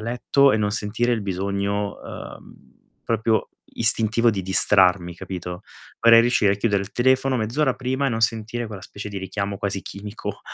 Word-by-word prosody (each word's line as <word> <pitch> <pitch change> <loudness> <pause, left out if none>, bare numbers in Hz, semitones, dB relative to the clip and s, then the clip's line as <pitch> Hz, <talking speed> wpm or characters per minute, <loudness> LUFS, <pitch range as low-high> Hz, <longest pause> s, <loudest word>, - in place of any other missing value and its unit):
letto 125 +4 +2
e - - +2
non 105 -1 0
sentire 110 +3 -1
il 115 -3 -1
bisogno, 100 +1 -2
uhm, - - -11 0.3
proprio 110 -1 0 0.3
istintivo 115 +1 +2
di 100 -4 -3
distrarmi, 95 -2 +3
capito, 90 0 -7 0.4
vorrei 115 0 +8
riuscire 115 -4 +3
a - - -2
chiudere 100 -2 0
il 100 - -10
telefono 130 +1 +2
mezz'ora 125 +5 0
prima 130 +2 -2
e - - +2
non 115 - -2
sentire 115 +1 -1
quella 105 -4 -9
specie 105 +2 -8
di 100 -1 -5
richiamo 100 +1 -4
quasi 100 -1 -3
chimico 105 0 -7
105 Hz, 165 wpm, -23 LUFS, 100-115 Hz, 0.4 s, vorrei